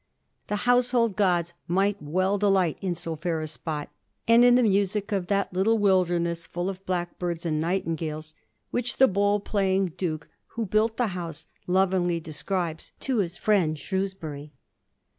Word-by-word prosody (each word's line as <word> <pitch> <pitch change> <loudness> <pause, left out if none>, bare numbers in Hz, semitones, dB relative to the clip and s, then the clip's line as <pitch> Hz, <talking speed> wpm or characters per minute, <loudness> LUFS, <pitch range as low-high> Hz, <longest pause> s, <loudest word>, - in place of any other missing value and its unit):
^ - - -44
The 210 - -1
household 245 -3 +3
gods 175 -4 +1
might 195 +3 +1
well 185 +7 0
delight 190 -5 +2
in 185 -3 -1
so 165 -1 -4
fair 165 +1 -2
a 155 - -3
spot 150 -1 -5 0.4
and 230 +1 +7
in 245 0 +7
the 250 - +4
music 200 0 +1
of 190 -3 -1
that 200 0 0
^ - - -17
little 215 +5 +3
wilderness 175 -4 +1
full 175 +2 -3
of 190 0 -7
blackbirds 175 -1 -2
and 155 -2 0
nightingales,' 160 -3 -2 0.4
which 245 0 -1
the 265 - +7
bowl 205 0 +2
playing 195 -3 0
Duke 155 -4 -3 0.3
who 230 - 0
built 215 +3 +1
the 245 -3 +1
house 170 -4 -5 0.2
lovingly 180 -2 +2
describes 165 +1 -3
to 265 -3 -1
his 175 -4 -1
friend 180 -8 +2
Shrewsbury. 160 -6 -4
185 Hz, 160 wpm, -26 LUFS, 170-205 Hz, 0.4 s, and